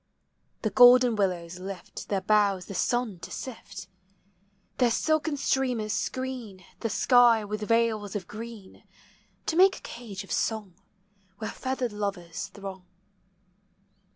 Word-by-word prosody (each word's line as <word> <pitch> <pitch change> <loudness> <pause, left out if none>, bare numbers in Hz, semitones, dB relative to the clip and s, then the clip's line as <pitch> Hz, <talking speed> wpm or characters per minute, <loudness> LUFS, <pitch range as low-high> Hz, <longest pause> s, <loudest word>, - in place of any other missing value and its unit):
The - - 0
golden 245 -1 +7
willows 180 -3 -1
lift 190 -1 -8
their 195 -2 0
boughs 200 -2 +2
the - - -8
sun 240 -2 0
to - - -8
sift: 200 -7 -8 0.9
Their 250 -2 +5
silken 310 +4 +1
streamers 250 -6 0
screen 245 -8 -4
the 230 - -2
sky 240 -2 +5
with 210 +1 -4
veils 220 -2 +1
of 190 -4 -4
green, 220 -2 -9 0.6
To 320 - -1
make 380 +2 +6
a - - -13
cage 220 -5 -8
of 195 - -13
song, 215 -5 -1 0.6
where 220 - -4
feathered 260 -3 -3
lovers 200 -5 -4
throng. 195 -2 -9
215 Hz, 125 wpm, -27 LUFS, 195-245 Hz, 0.9 s, golden